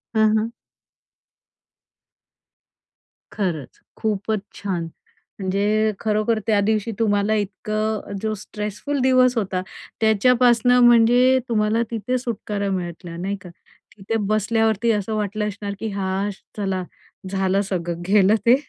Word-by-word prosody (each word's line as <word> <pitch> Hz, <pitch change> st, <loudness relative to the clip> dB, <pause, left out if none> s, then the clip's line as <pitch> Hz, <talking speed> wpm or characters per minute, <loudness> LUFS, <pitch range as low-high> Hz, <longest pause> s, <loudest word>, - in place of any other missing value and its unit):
हं, 220 Hz, 0 st, +4 dB
हं. 225 Hz, +2 st, -1 dB, 2.8 s
खरंच, 170 Hz, -, -3 dB, 0.2 s
खूपच 215 Hz, 0 st, -1 dB, 0.2 s
छान! 185 Hz, -4 st, -3 dB, 0.6 s
म्हणजे 205 Hz, +3 st, +1 dB
खरोखर 215 Hz, +1 st, +1 dB
त्या 210 Hz, -2 st, +3 dB
दिवशी 220 Hz, +2 st, 0 dB
तुम्हाला 205 Hz, -1 st, +2 dB
इतकं 215 Hz, +1 st, -2 dB
जो 220 Hz, 0 st, -1 dB
स्ट्रेसफुल 210 Hz, +8 st, -4 dB
दिवस 255 Hz, -1 st, +4 dB
होता, 190 Hz, -3 st, -1 dB, 0.4 s
त्याच्यापासून 245 Hz, +2 st, +4 dB
म्हणजे 245 Hz, +2 st, +5 dB
तुम्हाला 215 Hz, 0 st, +2 dB
तिथे 230 Hz, +3 st, -1 dB
सुटकारा 210 Hz, -4 st, -3 dB
मिळाला 175 Hz, -1 st, -5 dB
नाही 195 Hz, +3 st, -2 dB
का? 180 Hz, -, -11 dB, 0.5 s
तिथे 200 Hz, +3 st, -3 dB
बसल्यावरती 220 Hz, +1 st, +2 dB
असं 210 Hz, +1 st, -1 dB
वाटलं 210 Hz, 0 st, -1 dB
असणार, 200 Hz, 0 st, -5 dB
की 225 Hz, -, -3 dB
हाश 195 Hz, 0 st, -2 dB, 0.2 s
चला 190 Hz, -2 st, -1 dB, 0.5 s
झालं 195 Hz, 0 st, +1 dB
सगळं 175 Hz, -3 st, -3 dB
गेलं 205 Hz, +1 st, +5 dB
ते, 240 Hz, +2 st, +7 dB
210 Hz, 110 wpm, -22 LUFS, 195-225 Hz, 2.8 s, ते